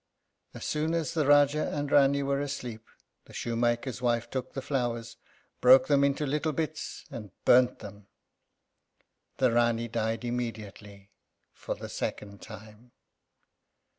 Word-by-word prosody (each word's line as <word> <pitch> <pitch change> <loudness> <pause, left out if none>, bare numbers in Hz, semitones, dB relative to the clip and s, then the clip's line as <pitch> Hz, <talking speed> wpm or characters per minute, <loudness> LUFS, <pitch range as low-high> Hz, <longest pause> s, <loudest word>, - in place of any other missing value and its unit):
As - - -7
soon 155 +2 -1
as 165 -1 -2
the 155 -3 +1
Rájá 145 +1 +4
and 145 0 -2
Rání 140 0 +4
were 140 0 0
asleep, 125 -6 -6 0.4
the - - -16
shoemaker's 120 +1 -1
wife 120 -1 0
took 130 -1 -4
the 135 - -4
flowers, 120 -4 -3 0.4
broke 130 +1 +7
them 140 -1 +3
into 140 +1 +1
little 150 +2 -1
bits, 155 0 -4
and 105 -3 -7 0.2
burnt 125 0 +5
them. 100 -1 -12 1.3
The 130 -1 +3
Rání 120 -1 +1
died 115 +1 -2
immediately, 105 -4 -6 0.4
for - - -5
the - - -8
second 100 -2 -5
time. 110 +2 -13
125 Hz, 135 wpm, -28 LUFS, 115-140 Hz, 1.3 s, broke